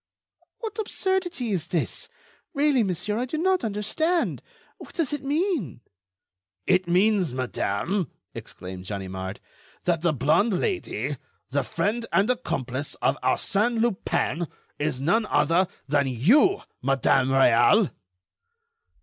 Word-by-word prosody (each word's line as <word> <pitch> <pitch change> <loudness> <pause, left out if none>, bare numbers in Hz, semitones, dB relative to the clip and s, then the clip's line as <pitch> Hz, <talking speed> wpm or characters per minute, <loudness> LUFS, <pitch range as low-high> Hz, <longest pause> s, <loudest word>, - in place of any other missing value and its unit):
"What 445 -1 -5
absurdity 375 - -1
is 180 -6 -1
this? 170 - -2 0.5
really, 285 -2 +3
monsieur, 210 +2 -1
I 250 - 0
do 285 +5 -4
not 370 +3 +2
understand. 230 - 0 0.4
What - - -12
does 315 -5 0
it 290 - -3
mean?" 285 - -1 0.8
"It 185 -1 +2
means, 185 - +2
madame," 130 - -1 0.2
exclaimed 90 0 -9
Ganimard, 95 -1 -5 0.4
"that 170 -3 +1
the 170 -1 +3
blonde 160 - +2
Lady, 375 -4 -2 0.3
the - - +1
friend 230 +3 -1
and 205 +5 +3
accomplice 135 - -3
of - - +1
Arsène 230 +3 +1
Lupin, 185 - 0 0.3
is 145 -3 -1
none 215 +9 +2
other 175 +3 +3 0.2
than 145 -1 +2
you, 225 - +4 0.2
Madame 135 0 +2
Réal." 135 - +5
190 Hz, 115 wpm, -25 LUFS, -, 0.8 s, Réal